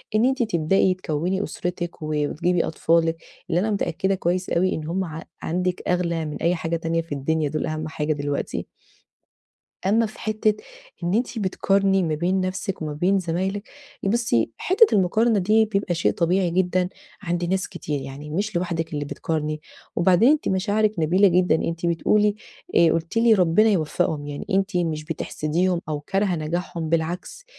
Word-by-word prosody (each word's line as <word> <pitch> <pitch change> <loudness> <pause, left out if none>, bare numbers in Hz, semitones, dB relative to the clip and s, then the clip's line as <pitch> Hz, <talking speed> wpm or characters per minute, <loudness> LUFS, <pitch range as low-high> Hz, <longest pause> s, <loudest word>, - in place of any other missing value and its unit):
إن 220 - +4
إنتِ 260 -1 +2
تبدأي 185 -1 +2
تكوني 180 +3 -2
أسرتِك، 175 -1 -4
و 155 - -4
وتجيبي 165 +4 +1
أطفالِك، 165 0 +1 0.3
اللي 170 - +2
أنا 215 +3 0
متأكدة 195 -1 0
كويس 180 +1 -1
أوي 185 +2 +2
إن 155 - -5
هم 190 +3 -1
ع 160 0 -7 0.2
عندِك 180 +2 -1
أغلى 170 -2 0
من 150 -1 -5
أي 170 +2 +2
حاجة 165 0 -2
تانية 165 0 -1
في 165 -2 -17
الدنيا، 150 +2 0
دول 155 - -2
أهم 155 0 -3
حاجة 155 0 -1
دلوقتي. 145 -1 -3 1.2
أمّا 225 +3 +3
في 215 - -12
حتة 215 0 +1 0.5
إن 175 +2 0
أنتِ 235 +1 0
بتقارني 195 -1 +2
ما 160 -2 0
بين 180 +5 0
نفسِك 185 0 -3
وما 155 -1 -3
بين 180 +6 +2
زمايلِك، 190 +4 -2 0.4
بصي 200 - +1
حتة 410 +5 +5
المقارنة 215 +4 +3
دي 215 +4 +4
بيبقى 200 -4 -1
شيء 170 - +1
طبيعي 180 +1 +1
جدًا 180 0 +1 0.3
عند 175 -2 -1
ناس 185 +2 -1
كتير، 145 -2 -4
يعني 135 +3 -8
مش 200 +4 -2
لوحدِك 170 -2 -2
اللي 145 -1 -2
بتقارني، 155 +1 -3 0.4
وبعدين 185 +6 +5
أنتِ 305 +1 +2
مشاعرِك 205 +3 +1
نبيلة 180 +5 +4
جدًا، 180 -2 +3
أنتَ 165 +1 -1
بتقولي، 205 +5 +2 0.4
آآ، 170 -1 +6
قلتِ 165 +5 -3
لي: 230 -1 +6
"ربنا 185 +4 +4
يوفقهم"، 155 -4 0
يعني 145 -1 -6
أنتِ 195 0 +1
مش 160 -3 -1
بتحسديهم 165 +2 -1
أو 150 -1 -2
كارهةٌ 195 +3 0
نجاحهم، 165 +1 -3
بالعكس. 170 - -2
175 Hz, 165 wpm, -23 LUFS, 160-195 Hz, 1.2 s, آآ